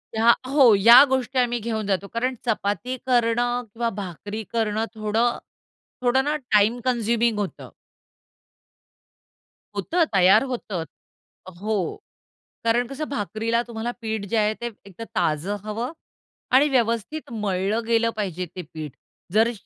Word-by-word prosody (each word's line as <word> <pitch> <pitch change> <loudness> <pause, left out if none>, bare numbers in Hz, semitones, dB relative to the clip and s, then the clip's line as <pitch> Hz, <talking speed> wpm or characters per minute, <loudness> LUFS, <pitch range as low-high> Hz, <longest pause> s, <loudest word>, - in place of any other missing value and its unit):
या 230 +2 +6 0.2
हो, 265 -5 +6
या 235 +7 +9
गोष्टी 260 -1 -1
आम्ही 240 -1 +1
घेऊन 220 -2 -3
जातो 200 0 -1
कारण 255 +2 -1
चपाती 215 +2 -1
करणं 245 0 +1
किंवा 230 0 -1
भाकरी 205 +3 -6
करणं 220 -1 0
थोडं 220 +3 0 0.6
थोडं 255 +2 +3
ना 295 +2 0 0.2
टाईम 215 +3 +4
कन्झ्युमिंग 235 -2 +1
होतं. 200 -2 -5 2.1
होतं 350 0 +1
तयार 190 +4 +6
होतं. 230 -9 -4 0.8
हो, 205 -3 -1 0.7
कारण 230 +1 +2
कसं 275 +4 -5
भाकरीला 225 -1 -1
तुम्हाला 235 0 -4
पीठ 220 -2 -3
जे 230 - 0
आहे 210 0 +2
ते 240 - -2 0.2
एकतर 200 +3 -9
ताजं 160 +7 0
हवं 225 +5 -3 0.6
आणि 280 +3 +6
व्यवस्थित 245 +3 -1
मळलं 205 +1 -1
गेलं 230 0 +3
पाहिजे 185 -4 -3
ते 185 - -4
पीठ. 155 -2 -6 0.4
जर 225 +2 +4
225 Hz, 130 wpm, -24 LUFS, 205-240 Hz, 2.1 s, या